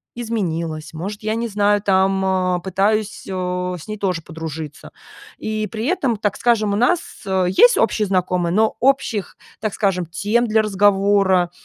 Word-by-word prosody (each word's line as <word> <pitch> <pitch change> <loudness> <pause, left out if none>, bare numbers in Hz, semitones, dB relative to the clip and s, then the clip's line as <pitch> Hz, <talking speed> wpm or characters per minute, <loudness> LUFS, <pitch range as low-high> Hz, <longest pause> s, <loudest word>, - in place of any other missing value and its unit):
изменилась, 170 -9 -3
может, 205 +7 -6
я 215 +1 -1
не 235 +1 -2
знаю, 205 -1 +2
там, 190 -1 +2
а, 185 -1 +1
пытаюсь, 200 +3 -1
о, 180 -1 -2
с 160 - -12
ней 215 0 -5
тоже 185 -4 -1
подружиться. 160 -2 -7 0.5
И 215 0 -3
при 220 +1 -4
этом, 270 - 0
так 205 -1 -1
скажем, 220 -4 +2
у - - +1
нас, 250 +10 +3 0.3
э, 190 -1 +1
есть - - +5
общие 215 - +2
знакомые, 180 -2 0
но 220 +2 +2
общих, 250 -6 0 0.2
так 215 -2 -2
скажем, 190 -4 0
тем 210 +8 0
для 220 0 +3
разговора, 195 -3 +3
200 Hz, 160 wpm, -20 LUFS, 180-215 Hz, 0.5 s, есть